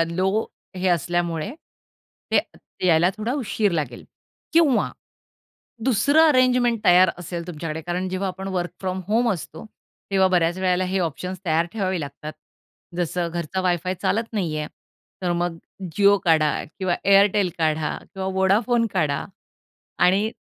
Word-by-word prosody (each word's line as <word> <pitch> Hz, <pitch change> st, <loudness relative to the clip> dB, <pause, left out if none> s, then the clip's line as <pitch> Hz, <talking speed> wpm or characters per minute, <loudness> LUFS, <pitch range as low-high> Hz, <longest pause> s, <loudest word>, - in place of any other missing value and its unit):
अ, -, -, +4 dB
law 190 Hz, +5 st, 0 dB, 0.3 s
हे 185 Hz, +1 st, 0 dB
असल्यामुळे, 175 Hz, 0 st, 0 dB, 0.8 s
ते -, -, +4 dB, 0.5 s
यायला 170 Hz, +1 st, +4 dB
थोडा 220 Hz, +3 st, -2 dB
उशीर 220 Hz, -7 st, 0 dB
लागेल 145 Hz, -8 st, -3 dB, 0.5 s
किंवा 320 Hz, -6 st, +3 dB, 0.9 s
दुसरं 285 Hz, +6 st, +4 dB
अरेंजमेंट 250 Hz, -4 st, +3 dB
तयार 180 Hz, 0 st, +6 dB
असेल 170 Hz, -1 st, -6 dB
तुमच्याकडे. 160 Hz, -2 st, -5 dB
कारण 175 Hz, +3 st, -3 dB
जेव्हा 185 Hz, +1 st, -2 dB
आपण 190 Hz, +1 st, -6 dB
वर्क 180 Hz, -2 st, -2 dB
फ्रॉम 185 Hz, 0 st, -2 dB
होम 230 Hz, +3 st, +2 dB
असतो 160 Hz, -2 st, -7 dB, 0.5 s
तेव्हा 190 Hz, -1 st, +4 dB
बऱ्याच 175 Hz, -1 st, +1 dB
वेळेला 185 Hz, 0 st, +1 dB
हे 190 Hz, +1 st, -1 dB
ऑप्शन्स 180 Hz, +3 st, -3 dB
तयार 165 Hz, 0 st, +1 dB
ठेवावे 190 Hz, -5 st, -1 dB
लागतात. 145 Hz, +1 st, -7 dB, 0.6 s
जसं 175 Hz, 0 st, -1 dB
घरचा 170 Hz, +2 st, -3 dB
वायफाय 180 Hz, 0 st, 0 dB
चालत 225 Hz, +2 st, 0 dB
नाहीये 160 Hz, -8 st, -2 dB, 0.6 s
तर 175 Hz, -1 st, +1 dB
मग 175 Hz, -1 st, -2 dB, 0.4 s
Jio 200 Hz, 0 st, +6 dB
काढा 160 Hz, -3 st, +4 dB, 0.3 s
किंवा 185 Hz, -3 st, 0 dB
Airtel 200 Hz, 0 st, +5 dB
काढा 155 Hz, -1 st, +1 dB, 0.2 s
किंवा 190 Hz, -1 st, -4 dB
Vodafone 225 Hz, +5 st, +3 dB
काढा 155 Hz, -6 st, 0 dB, 0.8 s
आणि 200 Hz, +4 st, +2 dB
185 Hz, 135 wpm, -23 LUFS, 170-200 Hz, 0.9 s, तयार